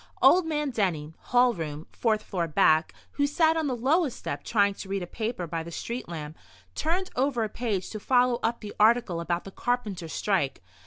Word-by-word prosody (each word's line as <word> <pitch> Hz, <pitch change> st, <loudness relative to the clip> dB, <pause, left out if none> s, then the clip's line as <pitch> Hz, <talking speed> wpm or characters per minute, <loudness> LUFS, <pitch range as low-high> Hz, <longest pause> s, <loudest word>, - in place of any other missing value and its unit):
Old 360 Hz, -2 st, +6 dB
man 300 Hz, -3 st, -1 dB
Denny, 165 Hz, -9 st, -1 dB
hall 245 Hz, 0 st, +3 dB
room, 155 Hz, -3 st, -5 dB
fourth 215 Hz, -2 st, 0 dB
floor 175 Hz, -4 st, -2 dB
back, 155 Hz, +1 st, +3 dB, 0.2 s
who 285 Hz, 0 st, +1 dB
sat 320 Hz, +2 st, +3 dB
on 320 Hz, -2 st, 0 dB
the 255 Hz, -, -1 dB
lowest 275 Hz, +4 st, +1 dB
step, -, -, -5 dB
trying 200 Hz, -2 st, +2 dB
to 195 Hz, -, -9 dB
read 195 Hz, -1 st, -1 dB
a -, -, -3 dB
paper 220 Hz, 0 st, -3 dB
by 165 Hz, 0 st, -3 dB
the 165 Hz, -, -7 dB
street 235 Hz, +6 st, -5 dB
lamp, 155 Hz, -2 st, -6 dB, 0.4 s
turned 360 Hz, -, -1 dB
over 255 Hz, -2 st, +1 dB
a 215 Hz, -, -2 dB
page 210 Hz, -4 st, -2 dB
to 215 Hz, -, -5 dB
follow 245 Hz, +1 st, +3 dB
up 230 Hz, +1 st, -1 dB
the 210 Hz, -2 st, -7 dB
article 215 Hz, -5 st, +3 dB
about 170 Hz, +1 st, -1 dB
the 195 Hz, -, -9 dB
carpenters' 210 Hz, -9 st, -2 dB
strike. 180 Hz, -, 0 dB
215 Hz, 200 wpm, -27 LUFS, 175-250 Hz, 0.4 s, Old